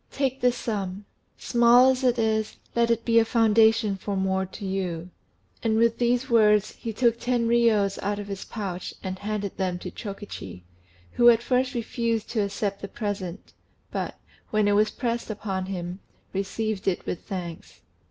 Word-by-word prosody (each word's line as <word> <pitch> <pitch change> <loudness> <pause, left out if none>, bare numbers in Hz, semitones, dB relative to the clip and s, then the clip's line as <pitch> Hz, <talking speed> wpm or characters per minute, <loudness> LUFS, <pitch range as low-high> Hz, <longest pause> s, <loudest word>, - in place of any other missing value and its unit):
Take 270 -1 -1
this 250 0 +3
sum: 200 -3 -3 0.3
small 240 +2 +5
as 260 0 -2
it 245 -1 +3
is, 220 -1 0 0.2
let 235 0 +3
it 230 0 +1
be 230 -1 +5
a - - +5
foundation 225 -2 +4
for 200 +1 -4
more 190 0 0
to 200 +2 -8
you." 180 -3 -3 0.5
And 220 -1 +1
with 230 0 +3
these 245 +2 +2
words 210 -4 +4
he 230 - -6
took 235 +1 +2
ten 240 -1 0
riyos 225 -4 +3
out 205 0 -1
of 205 0 -6
his 195 -1 -5
pouch 190 -5 -5
and 185 -1 -4
handed 205 -1 -3
them 185 -2 -1
to - - -7
Chokichi, 195 - -8 0.5
who 240 0 +6
at 235 0 +4
first 255 +1 +1
refused 230 -1 -1
to 225 - +1
accept 200 0 -2
the 200 - -4
present, 200 -4 -5 0.4
but, - - -3 0.3
when 215 -1 +2
it - - +3
was 210 +1 +4
pressed 235 +1 -3
upon 195 -3 -3
him, 180 -1 -5 0.3
received 200 +1 -2
it 185 - 0
with 180 - -3
thanks. 175 -5 -7
215 Hz, 170 wpm, -26 LUFS, 195-235 Hz, 0.5 s, who